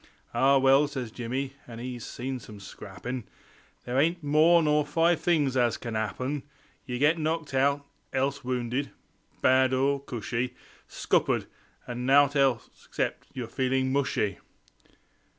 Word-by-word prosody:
"Ah 135 +1 +4
well," 135 +2 +5
says 130 -5 -5
Jimmy, 130 +4 -3
an' 115 -1 -9
'e's 120 -1 -6
seen 130 +1 -5
some 105 -2 -11
scrappin' 105 +5 -7 0.6
"There 125 +2 0
ain't 165 +3 +1
more 160 +4 +5
nor 150 0 +3
five 165 +3 +2
things 150 -7 +1
as 120 -2 +2
can 115 -2 -5
'appen; 130 +6 -2 0.5
Ye 125 -1 -3
get 150 +5 +3
knocked 160 -1 -2
out; 140 +2 +2 0.3
else 140 +1 -1
wounded 125 +2 -2 0.5
bad 130 0 +4
or 140 +2 +2
cushy; 125 -1 -3 0.3
Scuppered; - - +1 0.4
or 120 - -4
nowt 135 +4 +4 0.5
except - - -3
yer 125 -2 -3
feeling 130 +2 0
mushy." 135 -7 0
130 Hz, 135 wpm, -28 LUFS, 125-145 Hz, 0.6 s, well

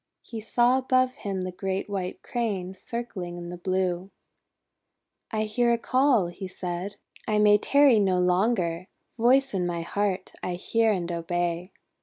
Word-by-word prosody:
He 225 -2 -7
saw 240 +3 +3
above 255 -1 +2
him 195 -5 -4
the 185 0 -3
great 190 +1 -3
White 190 -3 -4
Crane 200 -6 -2
circling 190 -4 -6
in 175 0 -7
the 175 - -5
blue. 185 0 -1 1.2
16 220 - -1
1 215 - -1
hear 235 +2 +2
a - - +2
call," 255 -3 +3
he 175 +2 -6
said. 185 +1 -5 0.3
'I 215 - +1
may 210 0 +6
tarry 280 -2 +5
no 190 -3 +2
longer! 180 -1 +1 0.3
Voice 265 +3 +4
in 180 -2 0
my 170 -1 -2
heart, 195 +1 -2
I 180 - -2
hear 225 +5 +1
and 175 -4 -2
obey!' 175 +1 -2
195 Hz, 160 wpm, -26 LUFS, 180-230 Hz, 1.2 s, may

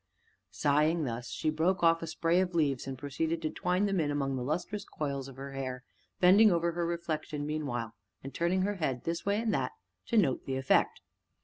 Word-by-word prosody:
Sighing 155 +3 +2
thus, 120 -2 -4
she 155 - -1
broke 175 +4 +1
off 165 0 +5
a 165 - -4
spray 165 +2 +1
of 180 -2 -2
leaves 140 -6 +1
and 135 -1 -4
proceeded 155 +4 -2
to 155 - -1
twine 180 +4 0
them 195 -2 +1
in 150 -3 +1
among 140 -2 -1
the 130 - -3
lustrous 175 +9 -2
coils 140 -7 -4
of 135 - -11
her 135 +1 -7
hair, 130 -2 -5 0.4
bending 200 +4 +7
over 170 0 +1
her 170 0 -2
reflection 155 -3 -3
meanwhile, 125 -7 -3 0.3
and 135 - -7
turning 180 +2 +1
her 205 +1 -1
head 130 -7 -2
this 165 +3 -3
way 200 +1 +2
and 225 -1 0
that, - - -1 0.3
to 235 - +1
note 160 -11 +2
the 135 -1 -1
effect. 135 0 +2
155 Hz, 205 wpm, -31 LUFS, 135-175 Hz, 0.4 s, bending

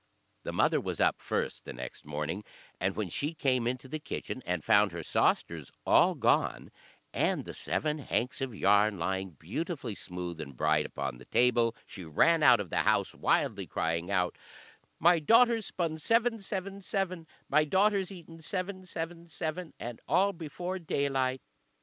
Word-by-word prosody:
The - - -4
mother - - +2
was - - -4
up - - +2
first - - -2
the - - -7
next 65 +3 -8
morning, 75 +7 -3 0.4
and 95 +1 0
when 105 -2 -2
she 145 - -3
came 130 -5 +1
into 125 +1 -3
the 155 +4 -4
kitchen 135 -3 -5
and 90 -3 -1
found 105 -1 +5
her 85 -1 -5
sausters 80 -1 +1 0.2
all - - +5
gone, - - +1 0.4
and - - +1
the - - -7
seven 150 0 -1
hanks 125 -2 -1
of 130 -4 -3
yarn 105 +1 +4
lying 95 +1 -2
beautifully 130 - -4
smooth 90 -3 -6
and 70 -4 -9
bright 75 +1 +2
upon - - -4
the - - -13
table, 120 -2 +3
she 95 - -9
ran 160 - +3
out 120 -6 +7
of 100 -5 -5
the - - -1
house - - +2
wildly, - - +1
crying 85 +2 -1
out 90 -3 0 0.6
"My 170 0 +5
daughter's 230 +5 +4
spun 160 -3 -2
seven, 230 +5 +2
seven, 195 0 -4
seven, 185 -4 -2 0.2
My 150 +2 +4
daughter's 195 +4 +2
eaten 165 -3 -11
seven, 185 +2 -4
seven, 170 0 -5
seven, 160 +1 -5
And 120 -1 -6
all 200 +1 +3
before 175 +3 -5
daylight." 135 -5 0
135 Hz, 165 wpm, -30 LUFS, -, 0.6 s, out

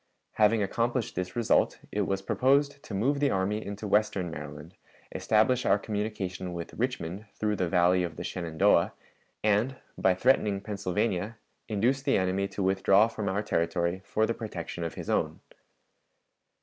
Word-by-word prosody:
Having 110 0 +3
accomplished 120 +3 -1
this 90 0 -4
result, 120 -2 +2
it 105 -2 0
was 95 0 -1
proposed 140 +5 +2
to 100 - -7
move 135 +8 +1
the 145 -1 +3
army 100 +1 0
into 100 +1 -6
western 100 -4 +1
Maryland, 75 +2 -8 0.4
establish 120 +4 +2
our - - +4
communication 100 -4 -4
with 85 -1 -6
Richmond 110 -5 -3
through 105 -1 0
the 90 -2 0
Valley 90 +1 +4
of 85 -3 -3
the - - -6
Shenandoah, 85 +1 +2 0.5
and, 110 +5 +2 0.2
by 95 -1 +3
threatening 105 -2 +2
Pennsylvania, 100 +1 -2 0.3
induce 120 +6 +1
the 140 0 +2
enemy 95 +1 0
to 100 0 -4
withdraw 95 +2 +4
from 110 -3 -3
our 100 +2 -1
territory 85 0 0
for 110 +2 +1
the 115 - -1
protection 85 -7 -6
of 85 - -4
his - - -7
own. - - 0
100 Hz, 155 wpm, -28 LUFS, 90-110 Hz, 0.5 s, our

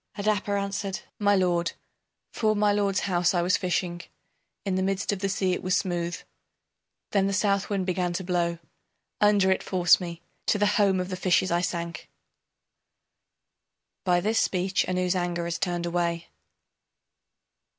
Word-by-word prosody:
Adapa 205 -1 0
answered: 200 0 -3 0.2
My 205 -1 +4
lord, 175 -3 +1 0.6
'Fore 215 -2 +1
my 205 0 +3
lord's 200 -2 +1
house 180 -2 +1
I 175 - +2
was 185 +2 +3
fishing, 175 -1 -1 0.6
In 195 - -1
the 185 - +1
midst 195 +2 0
of 200 - -3
the 195 0 -1
sea, 190 -1 0
it - - -3
was 185 0 +1
smooth, 175 -2 -2 0.9
Then 195 -1 +2
the 200 - -1
Southwind 200 0 +1
began 180 -1 0
to 185 - -3
blow 175 -1 0 0.6
Under 205 -2 +4
it 190 - +1
forced 180 -1 +3
me, 170 -1 -7 0.2
to - - +3
the 205 - +2
home 205 -2 +3
of 180 +1 -3
the 185 - -3
fishes 185 0 +2
I 175 0 +2
sank. 170 -2 -4 1.9
[By 175 -1 +2
this 220 +4 +1
speech 185 +1 +1
Ann's 185 0 0
anger 175 -1 -1
is 170 0 -3
turned 175 -1 -1
away. 170 -1 -1
185 Hz, 155 wpm, -26 LUFS, 175-200 Hz, 1.9 s, My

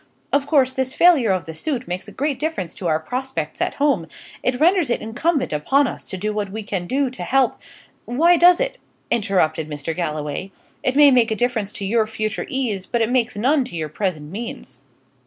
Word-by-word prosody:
"Of 280 0 +2
course, 265 -4 +3
this 260 0 -1
failure 330 -10 +5
of 185 -4 0
the 160 - -7
suit 255 - -3
makes 180 +1 -4
a - - -10
great 280 -1 -2
difference 300 - -3
to 180 - -5
our 155 -1 +2
prospects 260 +10 -4
at - - 0
home; 275 - +1 0.3
it 250 0 0
renders 345 -2 +3
it 240 - +1
incumbent 260 - -1
upon 270 - +2
us - - -6
to 190 - -5
do 210 +3 -2
what 205 -2 -3
we 220 +1 -5
can 190 -4 -3
to 265 +1 -1
help 265 -2 +2 0.3
" - - -35
"Why 330 +9 +4
does 350 +1 +6
it?" - - -2 0.3
interrupted 160 -8 +1
Mr. 150 +2 -4
Galloway. 155 +1 -3 0.3
"It 260 - 0
may 290 -1 +7
make 245 -3 +4
a 220 - 0
difference 225 -4 -1
to 200 - -5
your 220 +2 +2
future 215 -1 -3
ease, 235 -9 -2
but 235 - 0
it 225 - -1
makes 245 -4 +1
none 270 +6 +3
to 245 - -9
your 155 -2 -3
present 155 -3 -3
means." 225 +4 -7
235 Hz, 210 wpm, -21 LUFS, 190-270 Hz, 0.3 s, may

